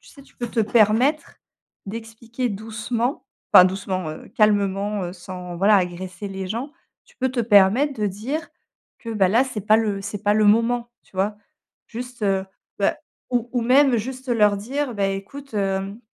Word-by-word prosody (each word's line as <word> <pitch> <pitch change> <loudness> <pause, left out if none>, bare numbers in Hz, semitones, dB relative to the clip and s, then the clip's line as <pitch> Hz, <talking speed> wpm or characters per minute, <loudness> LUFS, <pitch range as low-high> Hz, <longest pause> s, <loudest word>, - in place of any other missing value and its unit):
tu - - -19
sais, 280 - -15
tu - - -24
peux 240 -1 -4
te 230 - 0
permettre 225 +7 +2 0.5
d'expliquer 230 +3 -5
doucement, 230 +5 -3 0.3
enfin, 180 - +10
doucement, 185 -2 -2
heu, 155 - -9
calmement, 205 -1 +1
heu, 175 - -5
sans, 180 -1 -8
voilà, 200 +4 +5
agresser 185 +1 -3
les 190 -1 -5
gens, 250 +8 -4 0.3
tu - - -25
peux 260 - 0
te 255 - -5
permettre 225 +5 +4
de - - +2
dire 260 - -4 0.5
que 230 - -7
bah, 200 -4 +2
là, 230 +7 +4
c'est 255 -6 -5
pas 215 +1 +5
le 210 -3 0
c'est 205 0 -6
pas 205 0 +3
le 215 - +3
moment, 230 +3 +3
tu - - -28
vois? 205 +2 0 0.5
Juste, 245 0 -8
heu, 195 -1 +1 0.4
bah, 200 - +2 0.3
ou 245 -1 0
ou 245 -2 0
même 260 +1 +5
juste 260 +4 -5
leur 210 -4 +3
dire: 260 +6 -3
«Bah, 200 -2 +1
écoute, 220 +8 -7
hem, 195 +1 -2
215 Hz, 180 wpm, -22 LUFS, 195-240 Hz, 0.5 s, enfin